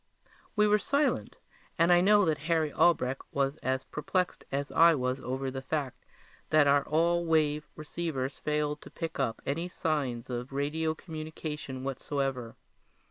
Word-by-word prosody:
We 210 -1 +4
were 210 0 +4
silent, 285 +6 0 0.4
and 170 +1 +5
I 175 - +6
know 205 +1 +5
that 155 -3 +1
Harry 160 -3 +2
Albrecht 135 -6 +2
was 140 0 0
as 130 0 -1
perplexed 180 +5 -2
as 140 +1 -2
I 165 0 +6
was 130 0 -1
over 130 +1 -3
the 135 0 -5
fact 140 -1 -3 0.5
that 155 -1 +5
our 140 0 +4
all 170 +2 +2
wave 150 -2 +1
receivers 150 -4 -4
failed 150 0 -1
to - - -11
pick 165 -2 -5
up 125 -4 -1
any 165 +6 -1
signs 140 -9 -2
of 125 +1 -5
radio 155 +3 -1
communication 155 -5 -6
whatever. 135 -3 -3
150 Hz, 150 wpm, -30 LUFS, 135-165 Hz, 0.5 s, I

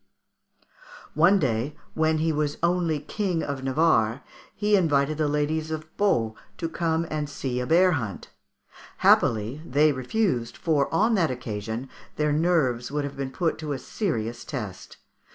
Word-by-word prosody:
One 170 +6 +5
day, 130 - -1 0.2
when 160 0 +2
he 160 +1 +1
was 150 -1 -1
only 170 -3 +1
King 180 +2 -2
of 140 -2 -4
Navarre, 130 -4 +2 0.3
he 210 +1 +2
invited 155 -4 +2
the 155 - +2
ladies 150 +2 -1
of 155 0 -6
Pau 120 - +1 0.2
to 165 - -2
come 165 0 -1
and 150 -1 -2
see 130 -3 -3
a 125 - -3
bear 180 +3 +5
hunt. 115 - -4 0.7
Happily 115 +6 +3
they 150 +1 +3
refused, 130 - -1
for 150 -4 +1
on 215 +8 +3
that 180 -7 +2
occasion 115 -1 -4 0.3
their 150 -1 +1
nerves 150 -7 +1
would 145 0 -1
have 140 -1 -5
been 135 -1 -3
put 165 +4 -1
to 150 -2 -3
a - - -3
serious 120 - -3
test. 105 -9 -7
150 Hz, 155 wpm, -25 LUFS, 130-165 Hz, 0.7 s, One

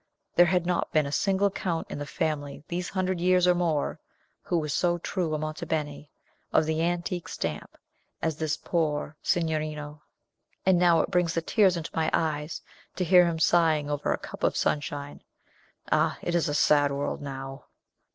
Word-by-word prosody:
There 175 - +7
had 180 -1 +1
not 180 0 0
been 155 -2 +3
a 140 - -4
single 195 +4 +2
count 170 -4 -2
in - - -4
the 145 - -5
family 145 -3 -3
these 175 +1 -3
hundred 185 -2 -1
years 180 0 +4
or 180 - +5
more, 165 -4 0 0.4
who 175 - -1
was 150 -3 -1
so 175 +2 +2
true 170 -2 -2
a - - 0
Monte 155 +2 -5
Beni, 150 -2 -3 0.4
of 155 - +4
the 160 +1 0
antique 175 +1 -1
stamp, - - -5 0.4
as 160 -2 -1
this 155 -1 -1
poor 155 -3 -1
signorino; 155 -3 -2 0.6
and 185 -2 +4
now 170 -2 +5
it - - -3
brings 175 -3 +1
the 165 - +1
tears 190 -1 +3
into 165 -1 -5
my 160 -1 +1
eyes 155 -1 -1 0.3
to 185 - -1
hear 180 0 +6
him 165 -1 -1
sighing 160 -3 +3
over 145 0 -1
a - - +1
cup - - -10
of - - +2
Sunshine! 145 -1 -2 0.7
Ah, - - +2
it 175 - -1
is 170 -4 +1
a 145 - -1
sad 145 -1 +4
world 140 +1 -3
now!" 135 -1 -7
160 Hz, 180 wpm, -27 LUFS, 150-175 Hz, 0.7 s, There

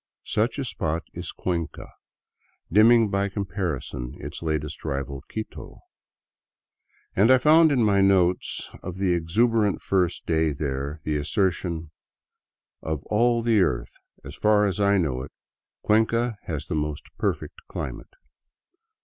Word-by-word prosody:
Such 110 +6 0
a 140 - -2
spot 80 -7 -2
is 85 0 -5
Cuenca, 85 -4 -4 0.8
dimming 110 +2 +6
by 100 0 0
comparison 90 - -4
its 75 +3 -7
latest 75 -2 -3
rival, 70 -2 -3
Quito, 110 0 -7 1.4
and 105 +5 +4
I 130 - +8
find 155 +4 +6
in 125 -4 +3
my 100 -2 +3
notes 95 -2 +2
of 90 -1 -6
the 95 -2 +1
exuberant 105 +5 +2
first 90 -3 0
day 80 -2 +1
there 70 +1 -4
the 75 -1 -1
assertion: 85 0 -1 0.9
''Of 80 -3 -3
all 115 +2 +3
the 115 -3 +3
earth, - - 0 0.3
as 70 +2 -9
far 105 -1 +3
as 100 -1 -1
1 100 -2 +3
know 65 -5 -2
it, 65 - -8 0.5
Cuenca 115 +2 +2
has 75 -3 -4
the 90 - -4
most 75 -1 -2 0.2
perfect - - -2
climate." - - -6
90 Hz, 130 wpm, -25 LUFS, 75-105 Hz, 1.4 s, I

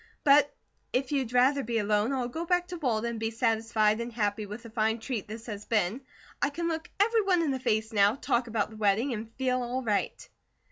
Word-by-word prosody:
But 285 0 +5 0.4
if 255 +2 -1
you'd 265 -5 0
rather 260 +3 +4
be 235 -2 -2
alone, 210 +2 +1
I'll 255 -3 -1
go 320 +7 -4
back 355 +1 +1
to 355 - -5
Walden 235 -6 0
and 230 - -5
be 225 0 -1
satisfied 225 -1 +1
and 235 +1 -5
happy 210 -2 -1
with 210 +4 -8
the 230 - -11
fine 220 0 +1
treat 230 -2 -4
this 220 +2 -8
has 210 -3 -6
been. 215 +2 0 0.4
I 285 - +3
can 335 +4 -3
look 325 -1 -3
everyone 400 -5 +3
in 300 - 0
the 265 - -2
face 220 -2 0
now, 205 +1 +4
talk 240 -2 0
about 220 -2 -1
the 220 - -11
wedding, 215 +5 +2
and 225 0 -6
feel 255 -1 0
all 250 +2 -3
right." 210 -3 -1
235 Hz, 220 wpm, -28 LUFS, 220-270 Hz, 0.4 s, But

